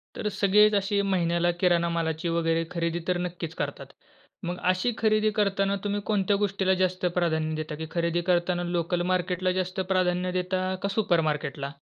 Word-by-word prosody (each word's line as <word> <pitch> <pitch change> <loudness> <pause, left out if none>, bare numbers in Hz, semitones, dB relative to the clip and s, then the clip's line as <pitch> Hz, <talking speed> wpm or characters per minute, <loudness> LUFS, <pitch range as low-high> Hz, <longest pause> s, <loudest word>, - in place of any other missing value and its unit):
तर 210 - -3
सगळेच 210 +2 +4
अशी 200 0 +1
महिन्याला 175 -3 +1
किराणा 170 -2 +3
मालाची 165 0 -1
वगैरे 165 0 +1
खरेदी 170 0 -1
तर 180 -1 +1
नक्कीच 170 -2 -6
करतात. - - -4 0.6
मग 175 +1 -3
अशी 185 +6 0
खरेदी 215 -1 +2
करताना 195 -1 +1
तुम्ही 205 0 -1
कोणत्या 205 -2 +1
गोष्टीला 195 -1 +1
जास्त 185 0 -1
प्राधान्य 160 -2 0
देता 155 0 -4
की 160 - -5
खरेदी 170 0 0
करतांना 175 0 +1
लोकलमार्केटला 180 +1 0
जास्त 185 +1 -5
प्राधान्य 180 -1 +1
देता 185 +1 -2 0.2
का - - +1
सुपरमार्केटला? 155 -8 0
180 Hz, 150 wpm, -26 LUFS, 170-195 Hz, 0.6 s, सगळेच